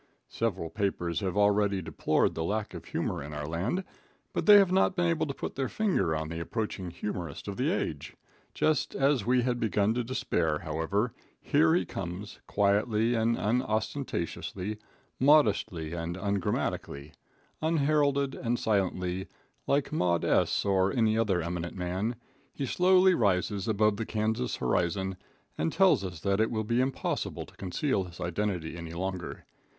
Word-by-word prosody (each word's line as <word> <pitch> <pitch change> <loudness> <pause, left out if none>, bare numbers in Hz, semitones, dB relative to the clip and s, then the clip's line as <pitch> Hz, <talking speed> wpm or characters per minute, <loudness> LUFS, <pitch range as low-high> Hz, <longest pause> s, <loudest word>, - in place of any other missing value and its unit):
Several 95 -8 -2
papers 90 -4 -1
have 95 -1 -2
already 100 -1 +3
deplored 90 - +1
the 80 - -3
lack 105 +4 -2
of - - -8
humor - - -2
in 75 +1 -7
our 75 0 -4
land, 95 - -1 0.5
but - - -2
they 205 -1 +10
have 195 -3 +5
not 190 0 +3
been 175 - +1
able 165 -2 +1
to 140 - -3
put - - -5
their 135 -2 -2
finger 140 - +1
on 80 0 -3
the 85 0 -4
approaching 95 0 -3
humorist 85 -3 -5
of - - -4
the - - 0
age. 75 - -3 0.4
Just 155 -3 +1
as 135 -5 +2
we 125 0 +3
had 120 -1 0
begun 105 -1 +2
to 120 +1 -1
despair, 85 -10 0
however, 85 +9 -1 0.3
here 160 +2 +3
he 180 - +1
comes, 95 +3 -6
quietly 105 +3 +2
and 115 0 +2
unostentatiously, 110 - -2 0.4
modestly 105 - +3
and 85 +1 -4
ungrammatically. 95 -7 -2 0.5
Unheralded 145 -3 +2
and 120 0 -1
silently, 95 -3 -1 0.4
like 140 0 +1
Maud 85 - +1
S. - - +2
or 95 -1 +3
any 110 -3 +2
other 100 -6 +1
eminent 85 +1 -4
man, 95 +6 -2 0.4
he 140 - -4
slowly 185 +5 +5
rises 100 - +1
above 105 -1 +2
the 110 - -3
Kansas 110 +3 -1
horizon, 90 +8 0 0.4
and 80 - +1
tells 190 - +4
us 90 -3 -5
that 100 +3 +1
it 110 - +3
will 110 -2 -1
be 115 +3 +1
impossible 130 0 -2
to - - -18
conceal 100 +2 -1
his 85 -1 -12
identity 90 -2 -2
any 85 -1 -7
longer. 95 0 -4
105 Hz, 155 wpm, -29 LUFS, 90-125 Hz, 0.5 s, they